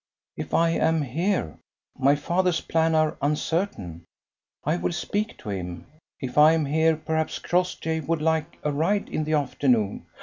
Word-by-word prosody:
"If - - -4
I 165 0 +4
am 160 -1 +2
here. 160 - -1 0.4
My 135 +2 +3
father's 175 +3 +1
plans 160 0 +1
are 155 -1 +2
uncertain. 145 - -2 0.6
I 155 +4 +1
will 175 - -1
speak 205 +5 -2
to - - -9
him. 90 -3 -5 0.3
If 130 +1 -1
I 155 +2 +8
am 160 -2 +1
here, 160 +3 +3
perhaps 160 0 -2
Crossjay 175 -2 -1
would 165 -1 +1
like 160 +1 0
a 150 - 0
ride 170 +8 0
in 155 - -2
the 155 - -1
afternoon." 130 -7 +1
160 Hz, 160 wpm, -25 LUFS, 145-165 Hz, 0.6 s, I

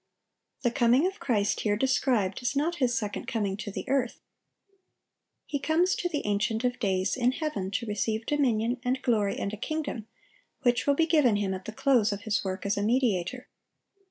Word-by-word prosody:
(837) - - +6
The 240 - -2 0.2
coming - - +4
of 390 - -20
Christ 210 -6 0
here 210 -1 +1
described 245 -6 +1
is 245 +3 -1
not 325 +5 0
His 245 -4 +1
second 210 -2 -4
coming 205 -4 -1
to 205 - -5
the 205 - -6
earth. 260 -3 0 1.3
He 285 - -3
comes 335 +6 +2
to 355 - -1
the 295 -4 -3
Ancient 210 +3 0
of 245 0 0
days 190 -2 0
in 250 0 +2
heaven 280 - -3
to 205 +4 -2
receive 220 +1 -2
dominion, 245 -4 +1
and 255 +1 0
glory, 210 -5 +1
and 200 - -3
a - - -4
kingdom, 270 -3 -4 0.6
which 245 +1 +2
will 285 - +4
be 325 - +3
given 300 -9 +4
Him 200 -2 0
at 185 0 -6
the 220 - -5
close 230 -2 +2
of 205 0 -4
His 215 -1 -1
work 190 0 -4
as 200 0 0
a - - 0
mediator. 240 +1 0
235 Hz, 195 wpm, -28 LUFS, 205-270 Hz, 1.3 s, 837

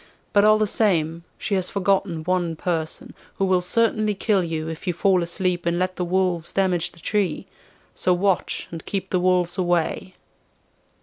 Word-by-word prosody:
But 205 - +5
all 215 0 +6
the 215 - +2
same, 170 -6 0
she - - -3
has 185 -2 0
forgotten 195 -4 0
one 175 -1 0
person, 160 -1 -3 0.2
who 195 - 0
will 185 -1 +2
certainly 215 +2 +1
kill 195 -1 +1
you 160 -2 -3
if 165 +3 -7
you 180 - +1
fall 185 +1 +2
asleep 175 +1 -1
and 170 0 +1
let 185 +1 -1
the 180 - -2
wolves 180 -2 0
damage 185 -3 +1
the 170 - -16
tree. 195 -1 -1 0.5
So 185 - 0
watch 185 +1 0
and 165 -2 -7
keep 190 -1 -4
the 185 - +2
wolves 180 0 +1
away. 175 +1 0
180 Hz, 175 wpm, -23 LUFS, 170-195 Hz, 0.5 s, all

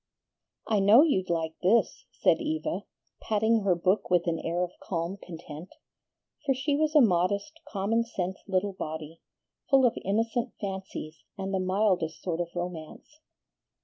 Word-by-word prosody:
"I 215 -2 +2
know 210 +8 +7
you'd 190 - +1
like 165 -1 -1
this," 210 +6 +2
said - - +3
Eva, 315 0 -2 0.4
patting 220 +1 +2
her 195 -4 +2
book 185 +4 +1
with 180 -1 +3
an 165 -2 0
air 175 +2 -1
of 180 - -3
calm 170 +1 -3
content; 165 -2 -9 0.7
for 270 -2 +1
she 280 +2 0
was 310 +1 0
a 300 - +8
modest, 200 - +1
common 220 +3 0
sense 190 -5 -4
little 195 +1 0
body, 160 -2 -6 0.5
full 270 -3 +6
of 240 - +3
innocent 225 +4 0
fancies 190 -6 -6
and 195 0 -4
the 190 - +1
mildest 185 -3 +1
sort 175 -2 -1
of 170 - -3
romance. 175 - -7
195 Hz, 150 wpm, -28 LUFS, 175-225 Hz, 0.7 s, a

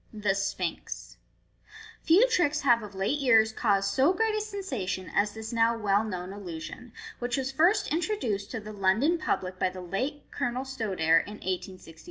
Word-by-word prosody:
The 210 -3 0
Sphinx. 195 -3 -4 0.4
— 445 +1 -18
Few 375 +9 +6
tricks 325 -10 +2
have 240 -4 +4
of 205 -2 -9
late 200 +10 0
years 225 -5 +5
caused 200 -3 +1
so 275 +7 +4
great 445 +2 +1
a 430 - 0
sensation 260 - -4
as 205 0 +2
this 220 +1 -6
now 230 0 +3
well 205 -1 +2
known 185 -3 -5
illusion, 190 +4 -8 0.3
which 245 +1 -1
was 270 0 -2
first 370 +9 +3
introduced 315 - -1
to 225 - -4
the 215 0 -9
London 215 - +2
public 185 -9 -2
by - - +2
the 185 0 -8
late 260 +11 -3
Colonel 245 +2 -2
Stodare, 190 -11 +2
in 205 - -7
1865. 185 -3 -5
220 Hz, 175 wpm, -28 LUFS, 195-285 Hz, 0.4 s, Few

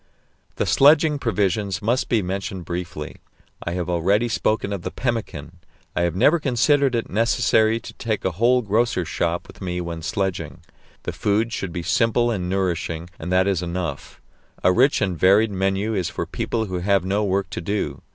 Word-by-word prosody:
The - - 0
sledging 150 +1 +5
provisions 100 -5 0
must 120 +6 0
be 115 -4 +2
mentioned 95 -1 -4
briefly. 85 -3 -5 0.5
I 85 - -3
have 90 -1 -2
already 95 +7 +2
spoken 110 -2 0
of 100 - -4
the - - -4
pemmican. 95 - -4 0.4
I 85 - +1
have 85 -1 0
never 155 - +4
considered 140 0 +2
it 115 - -1
necessary 110 +1 +2
to - - -10
take 110 -3 -3
a 95 - +1
whole 120 +7 +2
grocer's 105 -4 +1
shop 85 +1 -1
with - - -15
me 90 -1 -3
when 85 -2 -5
sledging; 95 +1 -3 0.4
the - - -4
food 110 +3 0
should 95 -6 -3
be 85 0 -4
simple 120 +6 +2
and 90 -5 -2
nourishing, 90 -3 -2
and 85 +3 -5
that 90 0 +4
is 95 -3 +1
enough 90 0 -5 0.4
a 90 - +5
rich 130 +9 +3
and 95 -5 -1
varied 100 +4 +5
menu 95 +3 0
is 95 -5 -1
for - - -4
people 115 -1 -2
who 90 -3 -3
have 95 0 +1
no 100 +3 0
work 95 -1 -1
to - - -4
do. 100 +4 -3
100 Hz, 180 wpm, -22 LUFS, 90-115 Hz, 0.5 s, sledging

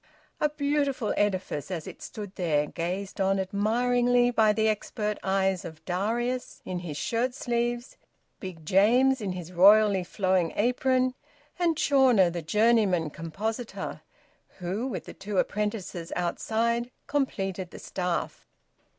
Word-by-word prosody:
A 300 - +2
beautiful 285 -5 0
edifice, 190 -7 -1
as 170 -5 -4
it - - -10
stood 205 -2 -8
there, 155 -5 +1
gazed 185 +5 -4
on 195 0 +2
admiringly 245 +5 +2
by 220 -3 +4
the 220 +1 +1
expert 210 0 -2
eyes 190 -1 +1
of 160 -1 -10
Darius, 235 +7 -2
in 185 -1 -3
his 165 -5 -6
shirt 240 +9 -1
sleeves, 240 0 -2 0.4
Big 175 -5 -8
James, 240 +9 +4
in 195 -3 -2
his 180 -1 -7
royally 200 +1 +6
flowing 185 -2 0
apron, 255 +3 +2 0.5
and 335 -3 +2
Chawner, 255 - +4
the 170 0 -4
journeyman 200 -3 +2
compositor, 215 - -5 0.6
who, 190 +7 -3
with 190 -10 -5
the - - -9
two 200 0 -5
apprentices 205 -5 -2
outside, 230 +7 0 0.2
completed 195 -10 -2
the - - -11
staff! 180 -2 -3
205 Hz, 130 wpm, -27 LUFS, 180-240 Hz, 0.6 s, royally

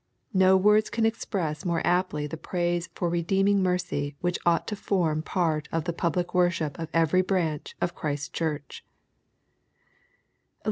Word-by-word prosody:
No 190 0 +5
words 210 +3 +4
can 225 -1 0
express 180 -8 -2
more 170 -2 0
aptly 175 -4 +1
the 150 - -5
praise 175 +1 -2
for 175 - -1
redeeming 195 +4 +2
mercy 180 -6 -1
which 175 0 -1
ought 170 -1 +3
to 210 - -2
form 170 -6 0
part 160 -3 -1
of 165 -1 -1
the 170 +1 -2
public 175 +1 -1
worship 175 -5 +1
of 165 - -4
every 165 +3 +3
branch 175 -5 -1
of 175 - -1
Christ's 145 -3 -3
Church. 150 -4 -4
175 Hz, 145 wpm, -27 LUFS, 155-185 Hz, -, No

